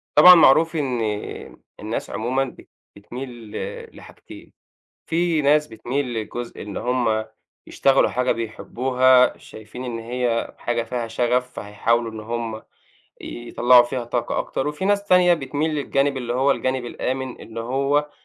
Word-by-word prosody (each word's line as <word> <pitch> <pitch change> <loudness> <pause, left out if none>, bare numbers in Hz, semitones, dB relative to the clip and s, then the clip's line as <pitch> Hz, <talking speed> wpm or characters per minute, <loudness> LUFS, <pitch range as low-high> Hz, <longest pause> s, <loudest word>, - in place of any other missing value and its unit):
طبعًا، 180 +4 +10
معروف 165 +1 +5
إن 130 -6 -1 0.8
الناس - - -4
عمومًا 130 +4 -1
بت 130 - -13 0.3
بتميل 120 +6 -8 0.2
ل 110 - -7
لحاجتين. - - -14 0.5
في 165 -1 +1
ناس 150 +1 +3
بتميل 125 +2 -3
لجزء 120 +2 -6
إن 100 -1 -6
هُم 120 -3 0 0.4
يشتغَلوا 135 0 +3
حاجة 125 0 0
بيحِبُّوها، 125 +3 +2
شايِفين 110 +3 -11
إن 120 -2 -4
هي 120 0 -2
حاجة 120 -1 -2
فيها 120 0 -4
شغَف، 125 +2 0
فهيحاولوا 115 +3 -1
إن 110 - -8
هُم 115 0 -4 0.6
يطلِّعوا 120 +1 +3
فيها 120 0 -4
طاقة 120 0 -2
أكتر. 135 - -3
وفيه 150 +6 -3
ناس 200 0 +2
تانية 180 -2 +5
بتميل 145 +1 -2
للجانب 140 -1 0
اللي 120 -2 -3
هو 130 +3 +2
الجانب 130 -2 -1
الآمن، 130 +1 -4
إن 115 0 -9
هو 140 +5 0
125 Hz, 140 wpm, -22 LUFS, 115-140 Hz, 0.8 s, طبعًا